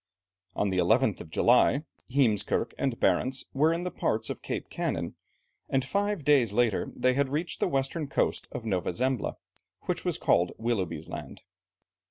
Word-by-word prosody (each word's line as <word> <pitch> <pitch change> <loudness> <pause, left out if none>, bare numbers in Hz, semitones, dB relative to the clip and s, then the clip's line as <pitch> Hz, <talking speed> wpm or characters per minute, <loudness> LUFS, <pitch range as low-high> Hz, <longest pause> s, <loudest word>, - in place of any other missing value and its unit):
On 100 -1 +1
the 95 - +1
11th 90 0 +3
of - - -10
July, 125 - +4 0.3
Heemskerke 125 -6 +1
and 130 -4 -1
Barentz 130 +8 +1
were 150 +4 +3
in 170 +1 -1
the 180 - -3
parts 110 0 -1
of - - -7
Cape - - -4
Kanin, - - -2 0.6
and 135 0 +1
five 200 +1 -1
days 135 -7 +4
later 115 -1 +1
they 130 0 +2
had 140 +1 +1
reached 155 +5 -2
the - - +2
western 135 +3 -1
coast 140 - 0
of 115 - -6
Nova 95 -4 -1
Zembla, 130 +3 -1 0.5
which - - -3
was - - 0
called 85 +1 +2
Willoughby's 95 -9 -2
Land. - - -8
125 Hz, 165 wpm, -28 LUFS, 105-140 Hz, 0.6 s, July